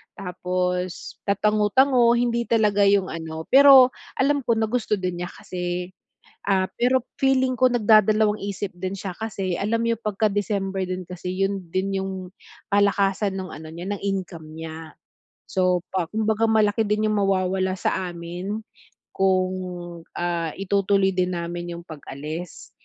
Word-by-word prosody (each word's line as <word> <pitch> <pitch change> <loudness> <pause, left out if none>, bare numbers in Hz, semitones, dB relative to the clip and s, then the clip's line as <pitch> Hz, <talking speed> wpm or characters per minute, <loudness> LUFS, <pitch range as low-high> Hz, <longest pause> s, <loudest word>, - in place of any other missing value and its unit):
tapos 180 -1 -3
tatango-tango. 215 +5 +3
Hindi 235 0 +1
talaga 210 -3 +3
yung 200 -2 +3
ano, 160 -1 -6
pero 270 -2 +8 0.3
alam 280 +1 +2
ko 235 - +2
na 220 - +1
gusto 215 -3 -1
din 180 -1 -3
niya 175 - -6
kasi, 180 0 -5 0.6
ah, 190 -1 +3 0.2
pero 255 0 +3 0.2
feeling 260 -1 +3
ko 255 0 +5
nagdadalawang 215 -2 +4
isip 200 0 -4
din 185 +2 -5
siya. 190 -1 -5
Kasi 195 -4 -3
alam 230 +3 0
niya 230 0 +1
pagka 215 0 0
December 195 -2 -1
din 185 0 -4
kasi, 180 +1 -6
yun 195 0 -2
din 195 +3 -1
yung 190 0 -3 0.6
kalakasan 200 -1 +2
ng 185 -1 -5
ano 155 +1 -9
niya, 170 +2 -7
ng 200 - -7
income 185 -5 -4
niya. 160 0 -7 0.7
So, 185 -2 +2
pa 185 -3 -1
kumbaga 220 +1 +1
malaki 220 -1 +2
din 210 +1 +1
yung 215 - +1
mawawala 190 -1 +1
sa 185 0 -1
amin 175 +5 -5 0.5
kung, 185 -1 +2 0.7
ah, 170 -2 -1
itutuloy 195 0 +2
din 185 0 +1
namin 175 0 -4
yung 170 - -10
pag-alis. 155 +2 -8
195 Hz, 145 wpm, -24 LUFS, 180-215 Hz, 0.7 s, pero